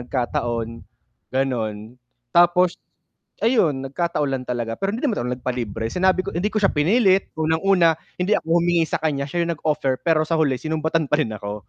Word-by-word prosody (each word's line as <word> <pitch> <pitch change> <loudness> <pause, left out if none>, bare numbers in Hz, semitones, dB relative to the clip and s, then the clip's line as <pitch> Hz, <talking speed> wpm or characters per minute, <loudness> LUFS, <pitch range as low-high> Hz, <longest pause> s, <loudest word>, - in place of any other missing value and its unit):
nagkataon, 120 -2 -2 0.7
ganon. 115 -3 -2 0.3
Tapos, 175 +1 +4 0.6
ayun, 170 - +2
nagkataon 150 -1 -1
lang 130 -1 -3
talaga 120 -2 -2
pero 195 +1 -1
hindi 260 - -5
naman 235 - 0
ako - - -2
nag-palibre, 120 -4 -3
sinabi 185 0 +2
ko - - -4
hindi 185 +5 0
ko - - -4
siya 195 - +3
pinilit, 190 +5 +3
unang-una, 165 +2 +3 0.3
hindi 190 +4 +1
ako - - -15
humingi 170 -1 +2
sakanya, 150 -4 -1
siya 170 +3 -1
'yong 170 0 -1
nag-offer, 135 -4 0
pero 155 -2 +2
sa 165 +1 0
huli 135 -4 +2
sinumbatan 160 0 -1
pa 150 - +3
rin 110 -6 -1
ako, 105 -1 -7
155 Hz, 170 wpm, -22 LUFS, 125-175 Hz, 0.7 s, Tapos